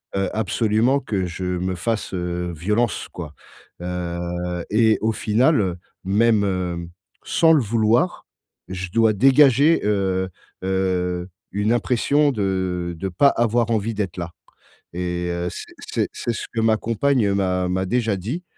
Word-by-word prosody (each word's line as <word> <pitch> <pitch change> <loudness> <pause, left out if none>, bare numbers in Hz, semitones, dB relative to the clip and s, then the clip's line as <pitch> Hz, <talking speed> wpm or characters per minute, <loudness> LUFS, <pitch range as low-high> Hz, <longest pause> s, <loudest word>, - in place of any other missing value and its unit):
heu, 95 -1 0
absolument 110 +4 +1
que 95 -7 -2
je 90 +1 -6
me 90 0 -2
fasse, 105 +4 -2
heu, 90 -1 -3
violence, 105 +8 0
quoi. 80 -4 -8 0.5
Heu 90 0 -3
et 110 0 +4
au 110 - +2
final, 115 +7 +2
heu, 90 -3 -1 0.3
même, 105 +1 +3
hem, 90 -3 -2 0.4
sans 165 -1 +4
le 155 -3 +5
vouloir, 115 - +1 0.4
je 95 0 -5
dois 115 +1 +4
dégager, 135 +6 +5
heu 95 -2 0 0.3
heu, 90 -1 -1 0.2
une 105 +3 +1
impression 140 +5 +2
de 95 -5 -2
de 95 +3 -3
pas 95 +11 +4
avoir 120 -2 +2
envie 110 +1 0
d'être 100 -4 -3
là. 85 -1 -5 0.6
Et 90 0 -2
heu, 85 0 -2
c'est - - -9
c'est - - -2
c'est 120 - -3
ce - - -5
que 115 - 0
ma 110 -1 +3
compagne 115 -3 +1
m'a 90 -2 0
m'a 95 +1 -1
déjà 110 0 0
dit. 125 - -4
100 Hz, 150 wpm, -22 LUFS, 90-115 Hz, 0.6 s, le